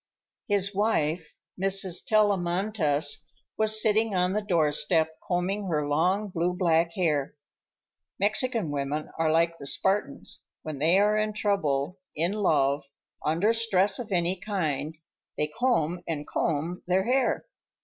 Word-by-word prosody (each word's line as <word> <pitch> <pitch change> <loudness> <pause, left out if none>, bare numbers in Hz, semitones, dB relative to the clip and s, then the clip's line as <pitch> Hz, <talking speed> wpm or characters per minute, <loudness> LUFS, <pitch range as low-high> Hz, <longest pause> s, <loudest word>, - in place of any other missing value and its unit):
His 200 -1 +2
wife, 165 -6 -1 0.2
Mrs. 195 -2 +4
Tellamantez, 185 -7 +1 0.3
was 220 0 +4
sitting 215 -1 +2
on 180 +1 +1
the 210 - 0
doorstep, 160 -3 +1
combing 190 +3 -1
her 150 -4 -1
long, 180 +8 +1
blue 180 0 -1
black 170 -2 +1
hair. 150 -7 -1 0.8
(Mexican 215 - 0
women 145 +2 -3
are 165 -1 +2
like 165 +1 +1
the 140 - -6
Spartans; 190 -2 -1 0.2
when 155 -3 -6
they 165 +5 +4
are 210 +1 +3
in 215 0 -1
trouble, 180 -6 -1 0.2
in 170 +4 +1
love, 145 -8 +1 0.4
under 170 +9 +2
stress 205 -3 +2
of 235 -3 -7
any 180 0 +1
kind, 160 -6 -3 0.4
they 150 - +1
comb 175 -2 0
and 150 -3 -3
comb 165 +3 -2
their 185 +1 +2
hair.) 255 +4 0
180 Hz, 130 wpm, -27 LUFS, 155-205 Hz, 0.8 s, Mrs